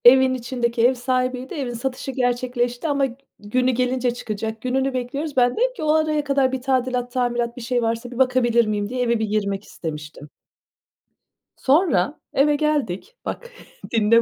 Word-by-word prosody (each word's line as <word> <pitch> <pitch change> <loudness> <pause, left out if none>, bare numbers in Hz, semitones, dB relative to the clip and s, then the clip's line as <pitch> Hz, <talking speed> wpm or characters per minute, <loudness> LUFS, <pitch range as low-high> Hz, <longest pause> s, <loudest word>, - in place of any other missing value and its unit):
Evin 260 +1 +8
içindeki 240 -1 +1
ev 260 - +2
sahibiydi, 255 +1 -1
evin 265 -5 -3
satışı 255 +3 -3
gerçekleşti 245 +1 -1
ama 280 -2 +2
g 250 -2 -6 0.2
günü 250 +5 +1
gelince 250 0 0
çıkacak, 220 -1 -4
gününü 265 +1 0
bekliyoruz. 270 +4 -3
Ben 245 -1 +5
de - - -8
dedim - - +2
ki 410 - -6
"O 305 0 +3
araya 310 -1 +2
kadar 275 -2 +2
bir 260 -1 -3
tadilat, 250 -1 0
tamirat, 240 -1 -1
bir - - -6
şey 245 +1 0
varsa, 230 +1 -2
bir 245 - -8
bakabilir 250 -2 +3
miyim?" 210 -1 -1
diye, 250 +1 -2
eve 235 -2 +2
bir 220 - +1
girmek 200 -2 -1
istemiştim. 150 -4 -7 1.3
Sonra, 280 - +2
eve 295 +2 +4
geldik. 300 - -1
Bak, 480 0 -5 0.4
dinle 230 0 +5
250 Hz, 170 wpm, -22 LUFS, 235-265 Hz, 1.3 s, Evin